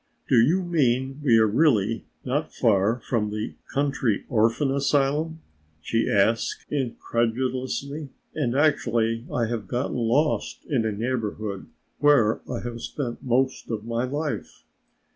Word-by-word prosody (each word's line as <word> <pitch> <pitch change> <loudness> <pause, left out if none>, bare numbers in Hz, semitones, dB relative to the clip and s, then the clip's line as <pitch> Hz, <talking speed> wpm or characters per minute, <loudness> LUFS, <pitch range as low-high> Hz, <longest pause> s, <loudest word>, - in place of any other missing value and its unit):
"Do 130 - +4
you 170 +10 +3
mean 135 -4 0
we 120 -6 +5
are 110 - +5
really 115 -3 +2 0.2
not 145 +5 -1
far 110 0 +2
from 110 -4 0
the 105 +1 -4 0.2
Country 135 -6 0
Orphan 115 +4 +2
Asylum?" 145 +3 +1 0.4
she 115 +8 0
asked 110 +3 +1
incredulously. 130 +2 -2 0.2
"And 130 -5 -1
actually 115 -6 +1
I 120 - +1
have 110 -3 -4
gotten 125 +5 -2
lost 125 +6 0
in 120 -7 +1
a - - 0
neighborhood 110 -3 -3 0.3
where 130 -7 +4
I - - -3
have 120 -1 -6
spent 125 -5 -4
most 130 +1 0
of 110 -2 -3
my 115 +1 -1
life! 145 +3 -4
125 Hz, 130 wpm, -25 LUFS, 115-140 Hz, 0.4 s, we